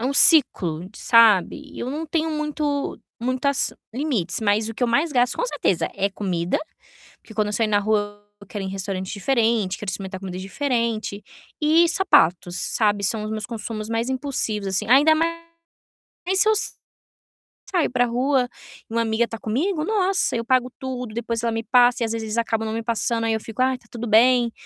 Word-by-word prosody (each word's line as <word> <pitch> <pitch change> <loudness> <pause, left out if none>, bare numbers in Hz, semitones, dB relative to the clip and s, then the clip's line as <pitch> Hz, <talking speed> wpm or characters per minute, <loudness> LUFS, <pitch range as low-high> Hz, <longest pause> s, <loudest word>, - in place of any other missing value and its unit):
é - - -3
um 275 - 0
ciclo 180 - +5
de - - -15
sabe, 230 - +3
eu 250 - -4
não 315 +3 -4
tenho 320 +1 -1
muito 300 -2 -2 0.2
muitas 255 +3 0 0.2
limites 250 - -1
mas 215 +1 +1
o 225 - -6
que - - -6
eu 245 - +3
mais 290 +6 +1
gasto, 245 0 +2
com - - -1
certeza, - - 0
é 195 +1 -1
comida, 180 -4 -2 0.6
porque 220 - -16
quando 210 -1 0
eu - - -4
saio 220 -1 0
na 205 0 +3
rua 205 0 -1 0.2
eu 200 - -14
quero 200 0 -6
ir - - -4
em - - -5
restaurante 190 -1 -4
diferente, 225 -3 0
quero 205 -3 -4
experimentar 190 0 -6
comida 185 -2 -6
diferente 230 -1 -2 0.4
e 325 +3 +4
sapatos, 180 - +2
sabe, 205 +2 +1
são 215 +2 0
os 215 - -5
meus 215 -1 -4
consumos 220 -2 -5
mais 230 +2 -1
impulsivos 255 -7 0
assim, 190 +2 -1
ainda 285 +5 +6
mais 330 +1 0 1.1
se 430 - +4
eu - - +5 1.2
saio 350 -9 +1
para 245 -1 +2
rua 250 +1 +1 0.4
e - - -9
uma 230 - +1
amiga 230 +1 0
tá 225 - -7
comigo, 305 - -1
nossa, 390 - +1
eu 230 - -1
pago 255 0 +1
tudo, 250 -4 -5
depois 230 0 -3
ela 230 - 0
me 225 0 -3
passa 245 0 +4
e - - +2
às 225 - -3
vezes 225 -1 -3
eles 220 +1 -4
acabam 225 -1 -1
não 220 - -3
me 230 - -2
passando, 230 0 -1
aí 225 - +1
eu 220 - -1
fico: 225 +2 -5
"Ai 260 0 +2
está 250 - -16
tudo 235 0 -5
bem!", 235 +2 +4
230 Hz, 200 wpm, -22 LUFS, 210-265 Hz, 1.2 s, ainda